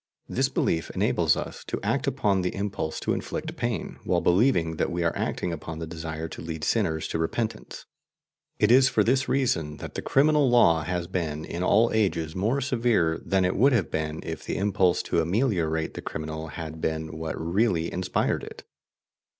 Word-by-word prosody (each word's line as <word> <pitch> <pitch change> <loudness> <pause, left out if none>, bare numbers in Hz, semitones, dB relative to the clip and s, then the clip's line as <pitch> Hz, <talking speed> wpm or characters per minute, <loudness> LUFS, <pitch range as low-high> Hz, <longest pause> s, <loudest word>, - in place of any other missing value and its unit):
This 130 +1 0
belief 80 -10 0
enables - - +2
us - - -6
to - - -3
act - - 0
upon 100 -2 +1
the 90 - -2
impulse 95 -5 -3
to - - 0
inflict - - -4
pain, - - -3
while - - +1
believing 85 -5 +2
that - - 0
we 85 0 -1
are 85 - 0
acting 90 - -2
upon 80 0 -6
the 80 - -4
desire 80 -1 -5
to - - -8
lead 80 -1 -6
sinners 80 -1 0
to 80 - -2
repentance. 110 +7 -3 0.7
It 105 - +3
is 130 +1 +7
for 105 - +2
this 130 +4 +1
reason 80 - 0
that - - -8
the - - -4
criminal 145 0 +3
law 85 -10 +5
has 90 +2 -2
been 80 -3 -3
in 85 - -5
all 110 +5 +4
ages 85 -7 0
more 110 +9 0
severe 115 -11 +1
than 95 -1 +2
it 90 - 0
would 135 +6 +4
have 105 -9 +1
been 80 0 -2
if 80 -1 -5
the - - -3
impulse 95 -3 +2
to 85 - +1
ameliorate 85 -4 0
the - - -6
criminal 80 0 -5
had 80 +1 -7
been 80 0 -2
what 80 0 -4
really 85 0 +1
inspired 90 0 0
it. - - -9
85 Hz, 185 wpm, -26 LUFS, 80-110 Hz, 0.7 s, is